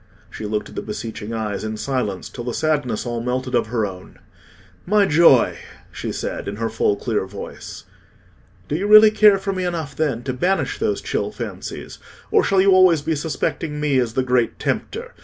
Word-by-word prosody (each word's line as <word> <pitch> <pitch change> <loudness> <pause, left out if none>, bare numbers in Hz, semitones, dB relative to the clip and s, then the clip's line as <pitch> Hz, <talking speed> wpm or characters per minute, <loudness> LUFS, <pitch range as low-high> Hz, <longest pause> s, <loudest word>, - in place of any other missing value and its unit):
She 105 - -6
looked 105 0 -2
at - - -13
the - - -4
beseeching 110 0 -6
eyes 110 -3 -3
in 110 0 -4
silence, 105 -7 -2
till 120 - -8
the 120 0 -4
sadness 145 -9 -1
all 120 -1 -3
melted 125 +1 -2
out - - +5
of - - -4
her 110 -1 0
own. 95 -2 -9 0.7
"My 205 +2 +3
joy!" 155 -7 +5 0.3
she - - -5
said, - - -4
in 100 - -4
her 115 +1 -2
full 105 -2 +1
clear 105 -2 -2
voice. 100 +1 -9 0.8
"Do 145 - -2
you 195 +5 -1
really 215 0 +9
care 210 -2 +6
for 195 0 -3
me 185 -1 -3
enough, 165 -6 -3
then, 135 -7 -1
to 130 0 -3
banish 180 +9 0
those - - 0
chill - - -2
fancies, - - -7 0.3
or 430 - +4
shall 195 - +2
you 195 +1 +4
always 185 -5 +5
be 160 - 0
suspecting 150 0 -3
me 145 -3 +2
as 115 -3 -1
the 130 - +2
Great 125 -2 +1
Tempter?" - - -3
130 Hz, 195 wpm, -21 LUFS, 115-170 Hz, 0.8 s, really